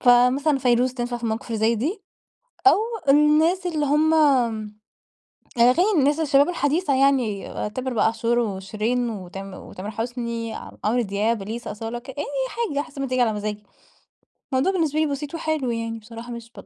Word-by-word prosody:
فمثلًا 255 +4 +4
فيروز 250 0 +2
تنفع 240 -1 -3
في 240 - -12
المواقف 220 0 -2
اللي 225 -2 -3
زي 225 +2 +3
دي، 320 - -2 0.6
أو 395 - +7 0.3
الناس 305 +6 +4
اللي 310 -4 0
هم 310 +3 +3 1.4
أغاني 255 - +5
الناس 290 +3 +2
الشباب 285 0 +4
الحديثة 300 -2 +1
يعني 260 -7 +2 0.2
تامر 255 +2 -4
بقى 220 - +3
عاشور 230 +1 +1
وشيرين 220 +3 -1
وتام 195 -1 -7
وتامر 195 +3 -8
حسني، 230 0 -4
ع - - -8
عمرو 230 +4 +2
دياب، 210 +1 -1
اليسا، 225 +3 -5
أصالة 225 +3 -5
ك 255 - -16
أي 290 +2 -4 0.2
حاجة 435 -11 -2
حسب 280 - -10
ما 275 - -1
تيجي 255 0 0
على 225 -2 +2
مزاجي. 210 0 -4 0.9
الموضوع 265 +9 +2
بالنسبة 315 -5 0
لي 315 - +3
بسيط 290 +1 -4
وحلو 315 -6 -1
يعني 230 0 -3
بصراحة 230 +2 -10
مش 235 -1 -8
245 Hz, 160 wpm, -23 LUFS, 225-290 Hz, 1.4 s, أو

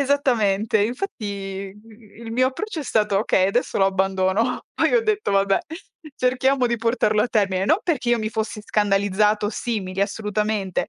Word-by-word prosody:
esattamente, 225 -7 +1
infatti, 200 - -4
mhmm, 220 +1 -15
il 225 - -6
mio 255 +2 +3
approccio 355 +6 -5
è - - -6
stato: 210 -5 +1
"Okay, 190 -3 +2
adesso 240 +5 -1
lo 195 - +4
abbandono". 195 +4 0
Poi - - +2
ho 475 - +4
detto: 430 - 0
"Vabbè, 195 0 +3 0.6
cerchiamo 255 +1 +2
di 235 0 0
portarlo 220 -2 +1
a 245 - -1
termine". 195 -4 +1
Non 325 - +4
perché 290 -8 -1
io 240 - +3
mi 215 -1 -3
fossi 220 -1 -3
scandalizzata 205 +1 +1
o - - -2
simili, 200 -5 -3
assolutamente, 210 -1 -1
215 Hz, 165 wpm, -22 LUFS, 200-245 Hz, 0.6 s, lo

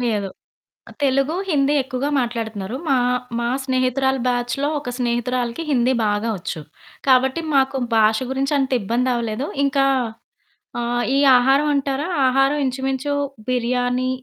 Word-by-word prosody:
లేదు. 215 -5 -1 0.8
తెలుగు, 275 +3 +1
హిందీ 285 -3 +2
ఎక్కువగా 265 +2 -3
మాట్లాడుతున్నారు. 225 -3 -3
మా 270 - +4 0.4
మా 235 - -1 0.2
స్నేహితురాల 265 0 +1
బ్యాచ్‌లో 245 +3 -1
ఒక 285 -4 -6
స్నేహితురాలికి 240 +2 -1
హిందీ 255 -1 +2
బాగా 210 +2 0
ఒచ్చు. 175 -2 -5 0.5
కాబట్టి 265 +4 +3
మాకు 270 0 +2 0.2
భాష 220 0 +4
గురించి 270 +2 -1
అంత 265 -1 -1
ఇబ్బందవ్వలేదు. 235 +2 -1 0.2
ఇంకా 275 0 +2 0.9
ఆహ్, 240 0 -1
ఈ - - +3 0.2
ఆహారం 270 +4 +3
అంటారా? 275 +2 -1 0.2
ఆహారం 270 +3 +2
ఇంచుమించు 265 +2 -2 0.3
బిర్యానీ 250 +1 0
255 Hz, 120 wpm, -21 LUFS, 240-270 Hz, 0.9 s, మా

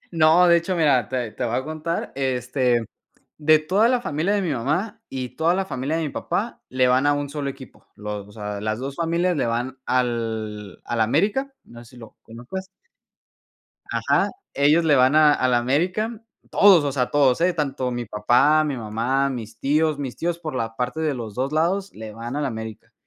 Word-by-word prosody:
no, 165 +2 +5
de 170 - +6
hecho, 170 +2 -1
mira, 145 -8 +2
te 125 -3 -2
te 125 - -4
voy 120 -1 -2
a 130 - 0
contar, 155 +3 -4
este, 125 -2 0 0.5
de 155 +1 +5
toda 190 +8 +2
la 250 -1 +2
familia 175 -1 -1
de 205 - +1
mi 175 - -1
mamá, 150 - -2
y 130 -2 -5
toda 165 +2 +2
la 195 +1 0
familia 135 -2 -3
de 165 - -1
mi - - -2
papá - - -3
le 130 0 +2
van 130 +3 +3
a 145 - +4
un 145 -1 -3
solo 145 -2 -3
equipo, 130 -4 -13
los 105 -1 -6
o - - -15
sea, 105 -1 -5
las 110 +1 -2
2 135 +1 -5
familias 170 +1 0
le 135 - 0
van 120 +3 -2
al 110 -5 -2
al 120 -1 -2
América, 205 - +1
no 120 0 -13
sé 115 - -17
si - - -15
lo 115 -2 -13
conozcas 125 +12 -8 1.2
ajá, - - +1 0.2
ellos 150 +4 +3
le 150 -3 +4
van 130 +2 +4
a 150 -1 +7
al 130 -3 +1
América, 180 - 0 0.3
todos, 190 -6 +6
o 140 - -1
sea, 125 -2 -1
todos, 140 -2 +3
eh, 180 +1 +3
tanto 140 -5 -2
mi 120 -1 -4
papá, 120 +9 +3
mi 145 -3 -2
mamá, 120 +5 0
mis 115 -3 -7
tíos, 155 +1 +1
mis 135 -4 -5
tíos 170 0 -2
por 155 -4 -6
la 115 -2 -3
parte 125 +6 -2
de 155 -3 0
los 115 -5 -6
2 135 +5 -2
lados 190 +5 0
le 110 -1 -8
van 115 +4 -6
al 150 -1 -1
América. 110 -3 -7
135 Hz, 205 wpm, -23 LUFS, 120-160 Hz, 1.2 s, a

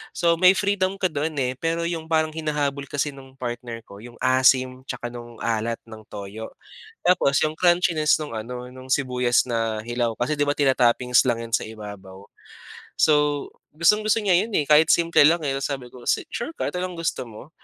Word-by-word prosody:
So, 170 -2 +2
may 185 +1 +6
freedom 195 -1 0
ka 185 -3 -1
do'n 155 +1 -2
eh, 125 0 -1
pero 165 +1 -1
'yong 165 -1 -3
parang 160 -1 +1
hinahabol 145 -3 -2
kasi 145 +2 -2
no'ng 135 -1 -14
partner 120 -2 -6
ko 100 -2 -13
'yong 120 +1 -12
asim 130 0 +3
tsaka 120 - -5
nung 120 -1 -10
alat 115 0 -1
ng 110 -2 -13
toyo, 105 +2 -8 0.5
tapos 170 -6 +3
'yong 155 0 0
crunchiness 175 -3 +3
no'ng 150 -4 -5 0.2
ano, 125 0 -7
no'ng 130 0 -12
sibuyas 125 -2 +2
na 115 -3 -2
hilaw 120 -1 -2
kasi, 145 +5 -2
'di 145 - +2
ba, 145 - +1
tinatoppings 125 -2 +3
lang 115 -1 0
'yan 115 - -12
sa - - -3
ibabaw. 100 -3 -10 0.8
So, 150 -2 +3 0.3
gustong-gusto 210 +7 +3
niya 190 -4 +3
'yon 220 +4 -1
eh, 150 - +1
kahit 155 +1 +6
simple 170 0 0
lang, 165 +3 +4
eh, 140 - -1
tapos 135 - -3
sabi 135 -3 -4
ko, 120 -1 -14
"Si - - +1
sure 265 +8 -5
ka, - - -2
ito 180 - -6
lang 180 0 -3
gusto 165 -6 -3
mo?" 115 +6 -12
140 Hz, 195 wpm, -23 LUFS, 120-165 Hz, 0.8 s, may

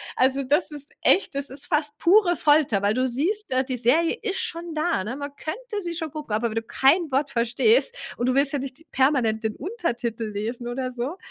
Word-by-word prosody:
Also, 265 +2 +2
das 295 +5 +1
ist 290 -1 -6
echt 370 -7 +3
das 280 -1 -2
ist 270 0 -7
fast 300 -3 0
pure 355 -1 +5
Folter, 290 -9 +3
weil 205 +1 +1
du 255 0 +1
siehst, 345 - -1
äh, 260 +1 +2
die 255 -2 -3
Serie 320 - +2
ist 390 -4 -1
schon 335 -1 -4
da, 310 - 0
ne, 235 +6 -4
man 285 0 -6
könnte 420 +5 -5
sie 345 -1 -4
schon 320 -2 -3
gucken, 300 -8 -6
aber 235 +2 0
wenn 215 - -7
du 225 - -1
kein 280 +6 +2
Wort 275 +2 +1
verstehst 345 - +2 0.2
und 240 - -1
du 255 - +1
willst 275 +1 +3
ja 285 - 0
nicht 275 +4 -7
permanent 250 -5 +2
den 220 -1 -2
Untertitel 240 - -3
lesen 230 +4 -4
oder 255 +1 -3
so. 255 +9 -4
275 Hz, 220 wpm, -24 LUFS, 245-335 Hz, 0.2 s, pure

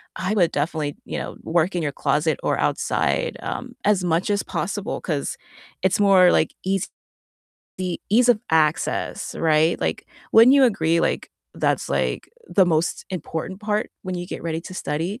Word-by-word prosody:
I 190 +3 -2
would 175 -6 +3
definitely, 150 -1 -2
you - - -4
know, - - -6
work 170 +2 +1
in 175 - -1
your 145 - -1
closet 150 +1 0
or - - +1
outside, - - 0
um, - - -5
as 200 -3 +3
much 170 +2 0
as 200 0 +1
possible, 195 +4 -3
'cause 150 -5 -3 0.5
it's 190 +1 +2
more, 190 -3 +6
like, 155 - +2
easy 195 -1 0 1.2
ease 240 +4 +4
of 220 -3 +2
access, 155 -1 0
right? 160 +1 +2
Like, - - -2 0.3
wouldn't 230 +4 +8
you 275 -1 +6
agree, 165 -8 +2
like, - - -1 0.2
that's, - - 0
like, - - -1 0.2
the 190 - +4
most 165 0 0
important 185 +1 -5
part 210 0 -1
when 185 -1 -4
you 175 0 -4
get - - -7
ready 165 -1 -2
to 185 - -9
study? 175 - -3
175 Hz, 165 wpm, -23 LUFS, 160-200 Hz, 1.2 s, wouldn't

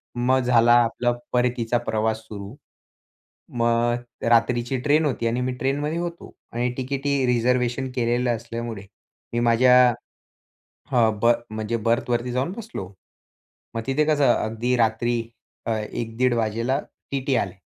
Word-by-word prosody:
मग 125 +2 +2
झाला 120 -2 +4
आपला 120 +1 0 0.2
परतीचा 120 -1 +1
प्रवास 110 -1 -1
सुरू. 100 0 -8 1.0
मग 120 +1 0
रात्रीची 120 +2 +2
ट्रेन 150 +3 +3
होती 125 -5 -1
आणि 120 +2 0
मी 125 0 -1
ट्रेनमध्ये 145 +5 -1
होतो 170 -1 -6 0.2
आणि 120 +1 -1
तिकीटही 135 +1 -1
रिझर्व्हेशन 125 +1 +1
केलेलं 120 0 +1
असल्यामुळे 115 -1 -6 0.5
मी 120 - +1
माझ्या, 120 +2 +5 1.2
हां, 110 -4 +2
बर्थ 115 +1 +3
म्हणजे 110 +1 -2
बर्थवरती 120 +1 0
जाऊन 130 +7 -1
बसलो. 220 - -6 0.9
मग 115 - -1
तिथे 150 +3 +2
कसं 145 -5 +4
अगदी 115 +3 -1
रात्री 115 +1 +1 0.4
अ, 115 - -1
1 110 +1 -5
दीड 125 0 +3
वाजेला 115 +4 0 0.3
टीटी 135 -1 0
आले. 95 -3 -1
120 Hz, 130 wpm, -23 LUFS, 115-130 Hz, 1.2 s, माझ्या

